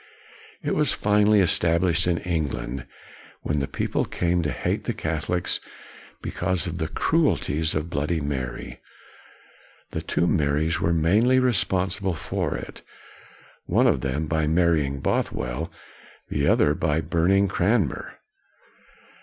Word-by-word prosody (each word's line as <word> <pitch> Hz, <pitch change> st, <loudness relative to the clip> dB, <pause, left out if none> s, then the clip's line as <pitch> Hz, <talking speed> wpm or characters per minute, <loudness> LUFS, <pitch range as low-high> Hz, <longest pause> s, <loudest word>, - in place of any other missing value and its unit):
It -, -, 0 dB
was 150 Hz, -2 st, +1 dB
finally 105 Hz, 0 st, +3 dB
established 85 Hz, 0 st, +2 dB
in 85 Hz, -2 st, +2 dB
England, 75 Hz, -8 st, -3 dB, 0.6 s
when 75 Hz, -1 st, 0 dB
the 70 Hz, -, -1 dB
people -, -, -1 dB
came 85 Hz, 0 st, 0 dB
to 75 Hz, -, -1 dB
hate -, -, -2 dB
the -, -, -2 dB
Catholics 80 Hz, +3 st, -1 dB, 0.6 s
because 95 Hz, -4 st, -1 dB
of 85 Hz, -1 st, -4 dB
the 80 Hz, -, -1 dB
cruelties 80 Hz, -, +1 dB
of 80 Hz, +2 st, -2 dB
Bloody 75 Hz, +4 st, 0 dB
Mary. 70 Hz, -4 st, -4 dB, 1.1 s
The -, -, -3 dB
two -, -, 0 dB
Marys 80 Hz, -1 st, +1 dB
were 85 Hz, -, +2 dB
mainly 100 Hz, +11 st, +3 dB
responsible 95 Hz, -6 st, +1 dB
for -, -, -2 dB
it: -, -, -9 dB, 0.9 s
one -, -, +3 dB
of -, -, +3 dB
them 70 Hz, +4 st, -1 dB
by 80 Hz, 0 st, 0 dB
marrying 80 Hz, -4 st, +2 dB
Bothwell, 60 Hz, +7 st, -2 dB, 0.6 s
the 70 Hz, 0 st, 0 dB
other 75 Hz, -, +4 dB
by 75 Hz, 0 st, 0 dB
burning 85 Hz, +5 st, +2 dB
Cranmer. 95 Hz, -, 0 dB
85 Hz, 125 wpm, -24 LUFS, 75-90 Hz, 1.1 s, other